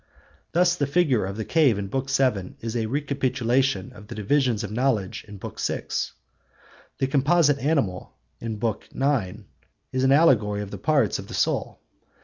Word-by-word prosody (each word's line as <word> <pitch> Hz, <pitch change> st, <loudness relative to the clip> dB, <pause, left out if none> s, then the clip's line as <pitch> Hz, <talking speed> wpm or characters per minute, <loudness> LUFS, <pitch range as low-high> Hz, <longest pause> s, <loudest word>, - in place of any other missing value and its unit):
Thus 175 Hz, 0 st, +4 dB
the 145 Hz, -6 st, -1 dB
figure 140 Hz, -, +2 dB
of 100 Hz, +1 st, -6 dB
the 110 Hz, -, -3 dB
cave 145 Hz, -10 st, +3 dB
in 100 Hz, -, -3 dB
Book 135 Hz, +6 st, -3 dB
VII 125 Hz, -9 st, +1 dB
is 115 Hz, 0 st, -5 dB
a 115 Hz, -2 st, 0 dB
recapitulation 130 Hz, -4 st, 0 dB
of 100 Hz, +1 st, -13 dB
the 120 Hz, -, -8 dB
divisions 115 Hz, +1 st, +1 dB
of 105 Hz, -, -5 dB
knowledge 115 Hz, -5 st, 0 dB
in 105 Hz, -1 st, -10 dB
Book -, -, -8 dB
VI. -, -, -1 dB, 1.1 s
The -, -, +1 dB
composite 145 Hz, +2 st, +3 dB
animal 135 Hz, -, -1 dB, 0.3 s
in 115 Hz, -1 st, -4 dB
Book 110 Hz, 0 st, -3 dB
IX 120 Hz, -8 st, 0 dB, 0.5 s
is 130 Hz, 0 st, 0 dB
an 130 Hz, -, +4 dB
allegory 110 Hz, -9 st, +4 dB
of 100 Hz, -, -9 dB
the -, -, -6 dB
parts 140 Hz, -, +2 dB
of -, -, -8 dB
the -, -, -7 dB
soul. -, -, -1 dB
130 Hz, 170 wpm, -25 LUFS, 105-140 Hz, 1.1 s, Thus